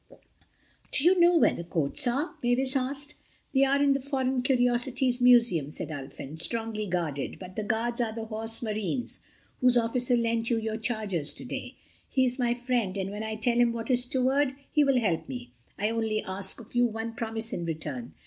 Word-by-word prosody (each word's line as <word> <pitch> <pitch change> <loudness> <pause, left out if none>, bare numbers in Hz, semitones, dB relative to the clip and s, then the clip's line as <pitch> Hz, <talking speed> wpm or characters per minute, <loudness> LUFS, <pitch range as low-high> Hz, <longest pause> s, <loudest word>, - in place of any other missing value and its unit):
"Do 280 - -1
you 360 +2 +5
know 345 0 +6
where - - +4
the - - -5
coats 170 - 0
are?" 275 +7 0
Mavis 255 +2 +1
asked. 275 +3 -1 0.4
"They 270 0 +5
are 275 +1 +3
in 285 -1 +4
the 275 - 0
Foreign 265 -2 -1
Curiosities 245 0 +1
Museum," 235 - +5
said 150 - -3
Ulfin, 140 +1 -6
"strongly 225 +2 0
guarded: 165 -6 -2
but 185 -1 -10
the - - -2
guards 235 +3 0
are 230 -2 0
the 225 0 -5
Horse 225 +1 -2
Marines—whose 235 +3 -1
officer 245 +1 +2
lent 230 0 0
you 235 - +2
your 220 -1 -2
chargers 215 -9 -1
today. - - -6 0.3
He 260 -1 +3
is 250 +1 -1
my 240 -1 +2
friend, 240 -6 -1
and 195 0 -2
when 210 +1 -5
I 220 0 -3
tell 235 +2 +1
him 240 -1 +4
what 230 +2 -3
is 245 0 +3
toward, 265 +1 +1 0.2
he 300 - +4
will 275 -2 +3
help 190 -8 -1
me. 120 -2 -7 0.3
I 210 +2 0
only 220 -2 -1
ask 190 +2 -5
of 230 -1 -13
you 245 0 +4
one 225 0 -5
promise 225 0 -3
in 175 - -3
return. 150 -7 -5
230 Hz, 190 wpm, -28 LUFS, 210-255 Hz, 0.4 s, know